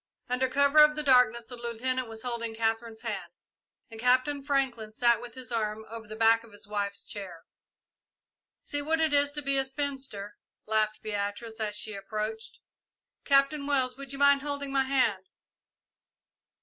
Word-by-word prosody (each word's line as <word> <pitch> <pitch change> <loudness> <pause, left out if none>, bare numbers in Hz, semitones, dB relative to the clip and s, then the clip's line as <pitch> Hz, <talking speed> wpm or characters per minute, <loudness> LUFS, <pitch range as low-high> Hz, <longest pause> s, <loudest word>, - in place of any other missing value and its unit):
Under 255 +1 0
cover 280 +2 +4
of 300 0 +7
the 300 - -2
darkness 250 -4 +4
the 245 - -9
Lieutenant 240 +2 -2
was 225 0 -7
holding 235 -2 -3
Katherine's 225 0 -2
hand, - - -5 0.6
and 225 - -9
Captain 255 +4 +2
Franklin 265 -6 -1
sat 235 0 +3
with 245 0 -10
his 255 -3 -8
arm 220 -1 -2
over 225 -1 -8
the 215 - -8
back 225 +1 +4
of 230 - -16
his 205 0 -10
wife's 200 -1 -3
chair. 185 -5 -8 1.2
"See 290 - -3
what 320 +3 0
it 320 -2 +2
is 285 0 +4
to 295 0 -4
be 275 0 +1
a 270 - 0
spinster," 265 -7 -4 0.3
laughed 215 0 0
Beatrice, 215 +2 -4
as 210 -1 -2
she 215 +1 -3
approached. 215 +3 -5 0.7
"Captain 280 +1 +3
Wells, 260 -3 +1
would 275 -1 -8
you 275 - -5
mind 280 0 +5
holding 285 -1 -3
my 270 -1 +2
hand?" 225 -8 +1
240 Hz, 165 wpm, -29 LUFS, 220-275 Hz, 1.2 s, of